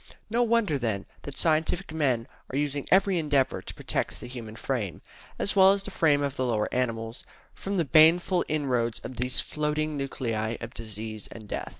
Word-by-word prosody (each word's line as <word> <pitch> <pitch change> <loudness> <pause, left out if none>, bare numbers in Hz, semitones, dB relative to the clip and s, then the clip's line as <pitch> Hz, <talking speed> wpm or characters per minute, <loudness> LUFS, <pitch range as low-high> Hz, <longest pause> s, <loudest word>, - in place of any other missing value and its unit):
No 235 +2 +2
wonder, 230 - +2
then, 110 -5 -1 0.2
that 140 -1 -8
scientific 160 +2 +1
men 130 -7 +1 0.2
are 130 - -3
using 145 -1 -1
every 190 -1 +4
endeavour 145 -4 +1
to - - -8
protect - - -2
the - - -8
human 115 -3 -8
frame, 110 - -3 0.3
as 200 - -1
well 190 0 +8
as 200 0 -2
the 200 - -6
frame 145 -5 +3
of 140 -1 -2
the 130 - 0
lower 110 -3 +1
animals, 115 -2 -2 0.3
from 200 0 -3
the 170 - +2
baneful 170 +5 +5
inroads 125 -7 0
of 130 - -7
these 125 +1 0
floating 150 0 -1
nuclei 115 -5 -2
of 120 +1 -7
disease 110 -1 -6
and 110 -2 -10
death. - - -4
140 Hz, 185 wpm, -27 LUFS, 115-160 Hz, 0.3 s, well